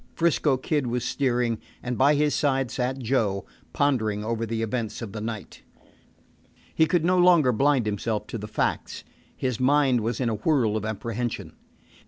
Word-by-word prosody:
'Frisco 155 -4 +2
Kid 145 0 -1
was 120 0 -2
steering, 120 -4 0 0.2
and 125 0 -2
by 140 +5 +4
his 150 0 +2
side 135 -4 +1
sat 130 +1 -2
Joe, 110 -6 0 0.3
pondering 110 -7 0
over 115 0 -2
the 115 0 -2
events 115 -1 -3
of 105 - -6
the 110 - -6
night. 110 -1 -6 1.1
He 160 - +3
could 165 0 +1
no 180 +1 +3
longer 175 -7 +5
blind 135 0 +2
himself 105 +1 -2
to 115 - -6
the 105 - -6
facts. 105 - -2 0.3
His 130 -4 -2
mind 135 -2 +3
was 115 +1 -2
in 130 - 0
a 115 - 0
whirl 110 -1 +1
of 110 0 -2
apprehension. 115 +2 -4
125 Hz, 170 wpm, -25 LUFS, 110-140 Hz, 1.1 s, longer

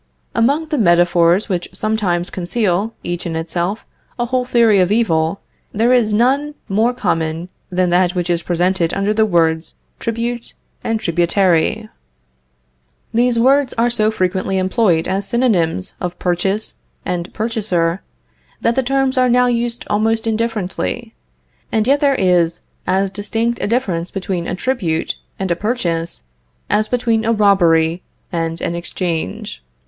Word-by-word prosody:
Among 280 +8 +2
the 300 -4 0
metaphors 175 0 +4
which 180 -4 -2
sometimes 190 -4 -1
conceal, 195 +2 -1
each 175 0 -3
in 165 - -3
itself, 175 +5 -2 0.3
a 240 - 0
whole 250 +1 0
theory 230 -5 +4
of 185 +1 +2
evil, 170 -6 +1 0.3
there 230 +4 +3
is 235 -4 +3
none 270 +7 +1
more 220 +5 +2
common 165 -6 -2 0.2
than 180 -1 +1
that 180 0 +2
which 175 -1 -1
is 170 -1 +1
presented 175 0 0
under 195 +2 +1
the 220 0 +2
words 165 -3 +1 0.2
tribute 230 +1 -3 0.3
and 225 -1 -1
tributary. 175 +4 +1 1.3
These 240 +1 +2
words 265 +3 +3
are 235 +1 +1
so 215 -2 +3
frequently 190 -2 -1
employed 185 -3 +2
as 195 +1 -2
synonyms 185 - 0
of 180 0 -3
purchase 190 +4 -1 0.3
and 175 0 -3
purchaser, 200 -6 -1 0.6
that 230 - +1
the 265 - +1
terms 270 +1 +1
are 255 0 +4
now 250 +1 +4
used 240 -1 -1
almost 225 +2 +1
indifferently. 225 0 -2 0.6
And 220 -1 +1
yet 280 +3 +3
there 280 -2 +3
is 175 -4 +2 0.3
as 190 +1 +1
distinct 225 +4 -2
a - - 0
difference 190 -8 -1
between 185 -3 -3
a - - -2
tribute, 185 -8 -1 0.2
and 190 -2 -2
a - - +2
purchase, 175 - -2 0.5
as 215 +1 +2
between 235 -3 +1
a 225 - +1
robbery 175 -6 +3 0.3
and 165 -1 -2
an 170 - -1
exchange. 170 - -4
200 Hz, 145 wpm, -18 LUFS, 175-230 Hz, 1.3 s, metaphors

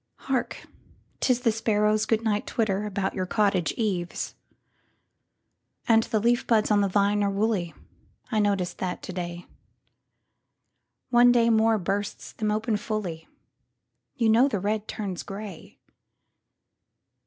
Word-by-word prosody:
Hark, 265 -2 -3 0.5
'tis 250 -2 +2
the 230 - +3
sparrows' 215 -1 +1
good 225 0 +1
night 210 -2 0
twitterAbout 205 -3 -1
your 185 -1 -3
cottage 200 -4 +1
eaves! 185 -6 -2 1.5
And 225 -1 +5
the 225 -1 -1
leaf 240 +3 +1
buds 220 -2 +2
on 205 -1 +4
the 200 - +2
vine 205 +1 +2
are 200 - +2
woolly,I 205 +2 -3
noticed 200 -4 0
that, 180 -1 -3
to 185 - -6
day; 175 -1 -5 1.7
One 245 0 +6
day 235 -1 +4
more 225 0 +4
bursts 200 +2 -3
them 215 -1 -2
open 215 +1 0
fully—You 210 +3 -6
know 235 +5 +5
the 215 -8 -1
red 210 +2 -2
turns 200 -5 -4
gray. 200 -3 -9
210 Hz, 120 wpm, -26 LUFS, 195-225 Hz, 1.7 s, One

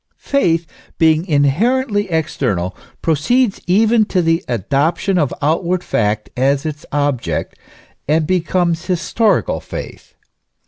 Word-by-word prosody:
Faith, 170 -12 +1 0.3
being 160 +2 +3
inherently 205 - +1
external, 125 - -1 0.3
proceeds 230 - +1
even 220 +5 +4
to 195 -3 -1
the 165 +1 +1
adop 135 - 0
tion 190 -2 0
of 145 -5 +1
outward 170 +4 0
fact 105 -1 -1
as 135 +3 +1
its 150 -1 -5
object, 130 - -1 0.5
and 155 +2 +2
becomes 175 -1 0
historical 200 +4 +1
faith. - - -9
165 Hz, 110 wpm, -17 LUFS, 145-190 Hz, 0.5 s, even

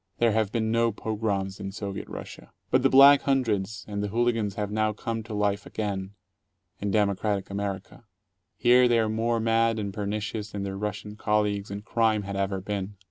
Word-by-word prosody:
There 115 -1 +3
have 110 -1 +1
been 110 -1 0
no 115 0 +2
pogroms 100 -3 -2
in 95 - -5
Soviet 100 -1 -6
Russia. - - -9 0.2
But - - +4
the - - +4
Black 140 +1 +8
Hundreds 110 -7 0
and 100 -1 -3
the 105 - -1
hooligans 115 -2 0
have 105 -1 -3
now 110 0 +1
come 115 +1 -4
to 110 0 -8
life 100 -1 0
again 100 -2 -4 0.3
— 95 -2 -49
in 100 - -1
democratic 100 -1 0
America. 100 +3 -5 0.5
Here 125 +1 +5
they 120 -1 +3
are 110 -1 +2
more 115 +1 0
mad 115 0 +2
and 100 -2 -3
pernicious 105 +1 -3
than 100 -1 -3
their 95 -1 -4
Russian 105 +1 -5
colleagues 105 -2 0
in 100 +1 -6
crime 110 -2 +1
had 100 0 -5
ever 95 0 -1
been. 100 0 -4
105 Hz, 190 wpm, -27 LUFS, 100-115 Hz, 0.5 s, Black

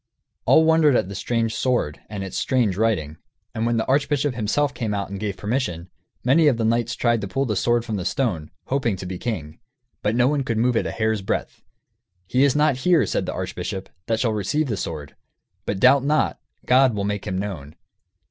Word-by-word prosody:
All 160 - +6
wondered 160 -4 +4
at 95 - +1
the - - -6
strange 115 +2 -1
sword 120 - 0
and 100 -2 -5
its 95 - -6
strange 120 -8 +1
writing; 95 -9 0 0.4
and 110 +1 -1
when 120 0 +1
the 110 - 0
archbishop 140 0 +1
himself 125 +6 0
came 115 -4 -2
out 100 -1 -3
and 100 - -5
gave 100 -2 -3
permission, 100 -7 -3 0.3
many 150 +5 +4
of 130 -5 +3
the 115 - 0
knights 115 +2 +1
tried 120 -2 +1
to 100 - -3
pull 135 +9 -1
the 110 -4 -1
sword 120 +3 +1
from 110 -3 -3
the 90 - -3
stone, 90 - -1 0.2
hoping 130 -6 0
to 95 - -8
be 90 -1 -5
king. 80 -10 -4 0.4
But 105 +2 0
no 125 +1 +4
one 145 0 +1
could 115 -3 -2
move 120 +2 +2
it - - +1
a - - -3
hair's 110 -2 0
breadth. 95 - -3 0.6
"He 125 +8 +2
is 140 -1 +3
not 150 -3 +3
here," 165 +1 +3
said - - -2
the - - -2
archbishop, 95 0 -5 0.2
"that 115 -1 0
shall 115 -3 +1
achieve 145 +9 0
the 110 - 0
sword; 75 -6 -6 0.5
but 100 - -1
doubt 130 +3 +5
not, 150 +2 +1 0.3
God 130 -2 +4
will 100 - -2
make 105 -1 -3
him 95 - -2
known." 85 -7 -5
115 Hz, 215 wpm, -23 LUFS, 100-130 Hz, 0.6 s, All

